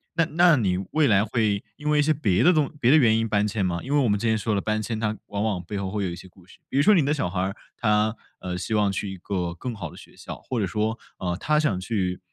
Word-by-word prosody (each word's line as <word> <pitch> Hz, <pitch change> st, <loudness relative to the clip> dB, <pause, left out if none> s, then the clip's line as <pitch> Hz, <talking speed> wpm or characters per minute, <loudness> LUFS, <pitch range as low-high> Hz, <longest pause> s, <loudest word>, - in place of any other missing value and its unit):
那 165 Hz, -1 st, +3 dB
那 170 Hz, -1 st, +5 dB
你 95 Hz, -6 st, +1 dB
未 155 Hz, -2 st, +3 dB
来 100 Hz, -1 st, +4 dB
会 105 Hz, -2 st, 0 dB
因 150 Hz, 0 st, -3 dB
为 150 Hz, 0 st, +3 dB
一 -, -, +6 dB
些 155 Hz, +2 st, +2 dB
别 115 Hz, -8 st, +1 dB
的 175 Hz, -, +6 dB
东 155 Hz, -5 st, +2 dB
别 125 Hz, -, +4 dB
的 155 Hz, -, +7 dB
原 110 Hz, -6 st, +4 dB
因 115 Hz, 0 st, -1 dB
搬 105 Hz, 0 st, +2 dB
迁 105 Hz, -2 st, -1 dB
吗？ 85 Hz, -1 st, -1 dB
因 140 Hz, -, -3 dB
为 145 Hz, -, +4 dB
我 125 Hz, -5 st, +2 dB
们 105 Hz, 0 st, +1 dB
之 115 Hz, -, -1 dB
前 110 Hz, 0 st, +2 dB
说 110 Hz, +1 st, -1 dB
的 -, -, +1 dB
搬 110 Hz, +1 st, -1 dB
迁 110 Hz, 0 st, -3 dB
它 110 Hz, -1 st, -1 dB
往 100 Hz, 0 st, -3 dB
往 100 Hz, -5 st, -1 dB
背 100 Hz, +4 st, -5 dB
后 100 Hz, -1 st, -3 dB
会 105 Hz, 0 st, -2 dB
有 95 Hz, -, -1 dB
一 85 Hz, -, -5 dB
些 95 Hz, -, -12 dB
故 90 Hz, -1 st, -20 dB
事。 -, -, -18 dB
比 -, -, -8 dB
如 140 Hz, -, +4 dB
说 210 Hz, -, +6 dB
你 160 Hz, -7 st, +3 dB
的 150 Hz, -, +2 dB
小 135 Hz, -12 st, -1 dB
孩 90 Hz, +1 st, -3 dB
儿， 95 Hz, +3 st, -1 dB, 0.2 s
他， 105 Hz, -1 st, +2 dB, 0.3 s
呃， 90 Hz, -1 st, -4 dB
希 110 Hz, +4 st, -4 dB
望 105 Hz, -2 st, +2 dB
去 95 Hz, 0 st, -3 dB
一 -, -, -9 dB
个 90 Hz, -2 st, -3 dB
更 120 Hz, +7 st, -5 dB
好 90 Hz, -6 st, -6 dB
的 -, -, -14 dB
学 -, -, -15 dB
校， -, -, -8 dB
或 125 Hz, -3 st, -3 dB
者 100 Hz, -, +1 dB
说， 110 Hz, +3 st, -1 dB, 0.2 s
呃， 90 Hz, -1 st, -2 dB
他 150 Hz, 0 st, +1 dB
想 105 Hz, -12 st, 0 dB
去 95 Hz, -3 st, -2 dB
105 Hz, 330 characters per minute, -25 LUFS, 95-130 Hz, 0.3 s, 的